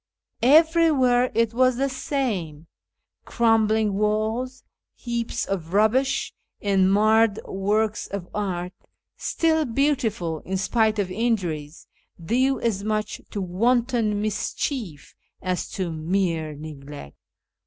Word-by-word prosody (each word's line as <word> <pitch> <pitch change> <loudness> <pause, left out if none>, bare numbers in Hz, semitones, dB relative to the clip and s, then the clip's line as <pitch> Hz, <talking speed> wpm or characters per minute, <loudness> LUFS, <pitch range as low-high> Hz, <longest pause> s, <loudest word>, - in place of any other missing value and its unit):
Everywhere 285 -3 +4
it 230 -1 +2
was 255 +1 +3
the 270 +3 0
same 220 - -3 0.3
— - - -58 0.3
crumbling 220 -2 +2
walls, 220 +5 -1 0.3
heaps 235 -1 -3
of 175 -3 -4
rubbish, 250 +6 +2 0.3
and 195 -2 +2
marred 215 +1 +4
works 210 +2 -1
of 200 -3 -6
art, 180 -3 -3 0.4
still 320 -1 +1
beautiful 230 - 0
in 190 +4 -4
spite 220 +2 +1
of 195 -3 -1
injuries, 180 -9 -2 0.3
due 255 +10 +1
as 205 -4 -1
much 215 0 -2
to 205 - -4
wanton 230 +3 +1
mischief 215 - -3 0.3
as 185 -1 -2
to 185 -3 -3
mere 160 -1 -1
neglect. 145 - -10
215 Hz, 110 wpm, -24 LUFS, 185-245 Hz, 0.4 s, Everywhere